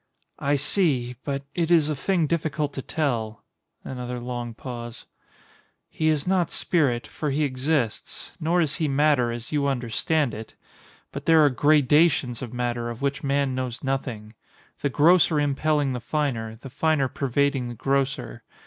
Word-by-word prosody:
_] - - -49 0.4
I 140 +1 +3
see—but 140 - 0
it 170 -2 0
is 165 -4 +5
a 155 - -1
thing 170 +4 +1
difficult 150 -2 -1
to 135 - -4
tell. 115 -8 -2 0.4
[Another 125 -1 -5
long 120 -1 -5
pause.] 120 -2 -7 0.9
He 155 - -1
is 150 -2 +1
not 180 -3 +1
spirit, 135 -9 0
for 150 - -4
he 145 +2 0
exists. 130 -3 -2
Nor 170 +3 +2
is 150 -3 0
he 160 -3 0
matter, 140 -3 +2
as 115 -1 -7
you 145 -2 +1
understand 135 +2 0
it. 110 0 -8 0.6
But - - -7
there 160 -2 +6
are 145 - +4
gradations 145 -1 +3
of 125 -4 -6
matter 120 -1 -2
of 120 +3 -7
which 140 0 -1
man 140 -1 +1
knows 130 -1 -4
nothing; 125 -6 -3 0.5
the 140 - 0
grosser 160 +2 +4
impelling 145 -1 +1
the 125 - -3
finer, 115 -4 -2
the 130 +2 -10
finer 155 -1 +1
pervading 135 -1 0
the 120 - -7
grosser. 135 0 -1
140 Hz, 160 wpm, -25 LUFS, 125-150 Hz, 0.9 s, there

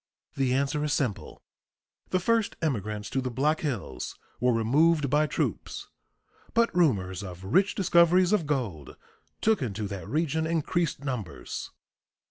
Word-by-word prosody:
The 130 -2 +1
answer 140 +2 0
is 150 -2 0
simple: 125 -9 -2 0.7
The 185 - +1
first 225 +3 +1
immigrants 105 - -2
to 135 - 0
the 130 - -2
Black 145 +6 +1
Hills 135 - -4 0.2
were 125 +1 +3
removed 140 +6 +3
by 150 +1 +3
troops, - - -3 0.7
but 230 -6 +3
rumors 100 - +2
of 90 -2 -8
rich 190 - +2
discoveries 180 0 +4
of 175 -8 +1
gold 110 - -3 0.4
took 220 -5 +3
into 105 -4 -3
that 95 -4 -6
region 160 +1 0
increased 165 -2 -1
numbers. 125 - -5
140 Hz, 135 wpm, -28 LUFS, 110-165 Hz, 0.7 s, discoveries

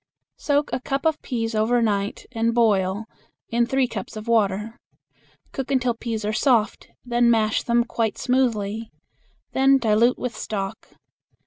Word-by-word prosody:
Soak 290 0 0
a - - 0
cup 275 +3 -3
of 315 -1 +1
peas 225 -3 -3
over 220 +3 +2
night 205 -3 -1
and 230 -1 0
boil 205 -3 +2 0.4
in 235 0 +1
three 265 0 +1
cups 220 -4 -7
of 215 +2 -8
water. 215 0 0 0.7
Cook 270 -1 -5
until 255 -3 +1
peas 225 -2 -4
are 210 - -1
soft, 230 -3 +1 0.2
then 240 -1 +2
mash 220 -2 +2
them 235 0 +2
quite 230 -2 -2
smoothly. 225 -4 0 0.6
Then 270 +1 +4
dilute 230 0 +3
with 250 -1 -4
stock. 195 -2 -5
230 Hz, 145 wpm, -23 LUFS, 215-250 Hz, 0.7 s, Then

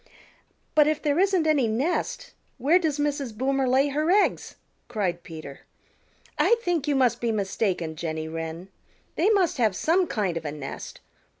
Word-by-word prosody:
"But 300 -1 +5
if 305 0 +1
there 295 +1 0
isn't 380 -4 +3
any 295 -6 +3
nest 305 - -2 0.2
where 295 +8 +4
does 315 -5 -1
Mrs. 285 -6 -2
Boomer 270 +1 +1
lay 270 +3 +3
her 305 +3 0
eggs?" 405 +3 +2 0.3
cried 190 -7 -2
Peter. 155 -5 -9 0.8
"I 470 - +5
think 335 -5 0
you 290 - +2
must 255 -3 +2
be 235 -1 +1
mistaken, 190 -5 -1
Jenny 160 -1 -4
Wren. 165 +3 -6 0.5
They 360 +6 +2
must 390 -6 +2
have 220 -6 +2
some 350 - +2
kind 190 -6 -1
of 165 - -5
a 145 - -2
nest. 145 -2 -8
260 Hz, 165 wpm, -25 LUFS, -, 0.8 s, But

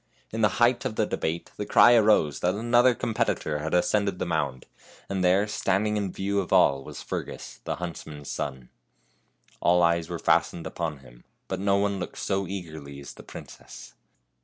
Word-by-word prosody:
In 110 - -3
the 105 -2 +2
height 120 +1 +3
of 110 - -3
the 110 - +2
debate 85 -4 -3
the 105 - -3
cry 120 - +7
arose 105 - +4
that 90 +2 +1
another 120 +3 +4
competitor 80 -10 -1
had 80 +3 -2
ascended 100 +1 +1
the - - -2
mound, 70 -6 -2 0.4
and 95 -1 -2
there 95 +3 +4
standing 105 0 0
in 100 -3 -1
view 100 +2 -1
of 95 - -4
all 70 -1 +4
was - - -9
Fergus, - - -6
the - - -2
huntsman's 80 -4 -7
son. 65 -3 -5 0.9
All 90 0 +4
eyes 85 -1 +2
were - - -3
fastened 85 - +1
upon 80 -5 -4
him, - - -17 0.2
but 95 - -3
no 100 0 +2
one 100 -1 0
looked 90 - -6
so 95 -1 -1
eagerly 80 -7 -7
as 70 - -9
the - - -12
princess. - - -11
90 Hz, 180 wpm, -26 LUFS, 80-105 Hz, 0.9 s, cry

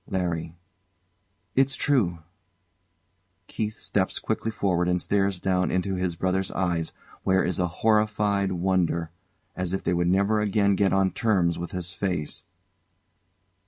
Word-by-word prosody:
] - - -39
LARRY. 85 -2 -2 1.0
It's 135 0 +3
true. 95 - +1 1.2
[KEITH 110 0 -4
steps 95 -2 0
quickly 110 0 -2
forward 90 -5 0
and 90 0 +2
stares 100 0 0
down 90 0 +1
into 95 +1 0
his 90 -2 -1
brother's 95 +2 -1
eyes, 85 -3 -1 0.3
where 95 0 +2
is 90 -1 -1
a 90 - +2
horrified 105 0 +1
wonder, 85 -2 0 0.4
as 90 0 -2
if 95 - -2
they - - +1
would 85 0 +1
never 100 +3 +2
again 100 -1 +2
get 100 0 +2
on 95 -1 +2
terms 95 -8 +1
with 85 - -4
his 90 -1 -4
face. 90 -7 -3
95 Hz, 140 wpm, -26 LUFS, 90-100 Hz, 1.2 s, It's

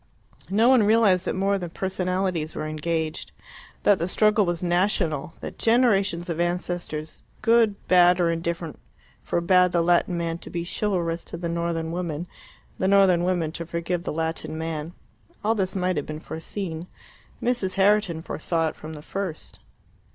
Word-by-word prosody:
No 215 +5 +3
one 255 -2 +6
realized 205 -4 +4
that - - -1
more 195 +1 +1
than 175 -2 -5
personalities 185 -3 -2
were - - -3
engaged; 155 +1 -2 0.5
that 205 -2 +4
the 170 - -1
struggle 210 +1 +3
was 175 0 -2
national; 175 -4 0
that - - -7
generations 205 -7 +2
of 170 -2 -3
ancestors, 175 -3 -3 0.2
good, 230 -3 +4
bad, 180 0 +6
or 170 -1 +3
indifferent, 165 -1 -3 0.4
forbad 180 +1 +3
the 170 -1 +2
Latin 175 +1 +2
man 170 0 -2
to - - -10
be 170 -1 -3
chivalrous 175 -4 -1
to - - -7
the 170 0 -3
northern 170 -1 -2
woman, 170 -2 -3 0.5
the 190 - +1
northern 190 -3 +5
woman 175 -3 0
to 170 - -5
forgive 170 +1 -3
the - - -3
Latin 160 0 -3
man. 160 0 -4 0.5
All 220 +2 +3
this 190 -3 -1
might 185 -2 0
have 145 - -2
been 155 0 -5
foreseen: 165 +1 -5 0.5
Mrs. 235 -6 -1
Herriton 195 -4 +2
foresaw 165 0 -1
it - - -10
from 155 +1 -9
the 150 -1 -9
first. 190 -4 -5
175 Hz, 160 wpm, -25 LUFS, 165-190 Hz, 0.5 s, one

